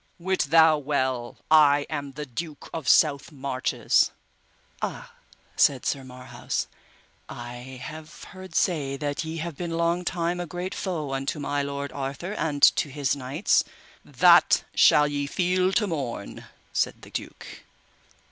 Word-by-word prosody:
Wit 185 -2 -1
thou 160 -1 +6
well 130 -4 -2
I 145 -2 +6
am 145 -3 -5
the 150 +2 -6
Duke 150 +4 -7
of 160 -5 -5
South 145 -1 +4
Marches. 135 -3 +1 0.7
Ah, - - -5 0.4
said 135 -3 +3
Sir 135 -2 -1
Marhaus, 125 -1 -5 0.6
I 125 +2 -8
have 155 +1 -9
heard 185 -3 -11
say 145 -7 0
that 145 +2 -3
ye 160 +1 -5
have 165 -1 -5
been 165 +1 -4
long 170 +1 +1
time 175 0 -1
a 175 - -4
great 180 +2 -5
foe 155 -8 -3
unto 135 +3 -2
my 145 0 -1
lord 140 0 -4
Arthur 140 +7 -5
and 150 -8 -2
to 145 - 0
his 140 0 -1
knights. 140 +7 +1 0.4
That - - +5
shall 150 0 +5
ye 145 -1 -2
feel 185 +3 +1
to 210 - +2
morn, 135 - -5 0.3
said - - -1
the - - -13
duke. - - -7
150 Hz, 145 wpm, -25 LUFS, 135-170 Hz, 0.7 s, thou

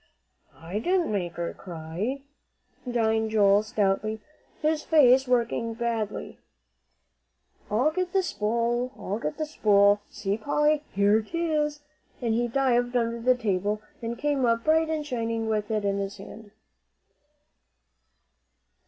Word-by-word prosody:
"I 170 +5 -4
didn't 355 - +1
make 180 -5 -2
her 170 -1 -4
cry," 180 - -5 0.6
denied 220 -2 +1
Joel, 205 -2 +4
stoutly, 215 0 -1 0.4
his 310 0 +1
face 265 -5 +5
working 230 -2 0
badly. 230 -3 -3 1.3
"I'll 245 +9 +2
get 365 +2 -2
the 385 0 +2
spool 235 - -1
I'll 205 +3 -4
get 150 - -4
the 310 - -1
spool. 205 -7 +3
See, 200 +2 -3
Polly, 295 +5 +2
here 205 +2 +3
'tis," 300 +2 -1 0.4
and 235 -3 0
he 240 +2 +1
dived 245 -1 +1
under 230 -1 0
the 255 +2 +4
table, 205 -2 -1 0.2
and 235 0 -4
came 285 0 0
up 230 -1 +2
bright 320 +1 +3
and 310 -2 -2
shining 230 -4 -2
with 215 -1 -1
it 215 -2 -1
in 200 0 0
his 200 +1 -4
hand. 210 +2 -11
230 Hz, 130 wpm, -26 LUFS, 210-270 Hz, 1.3 s, face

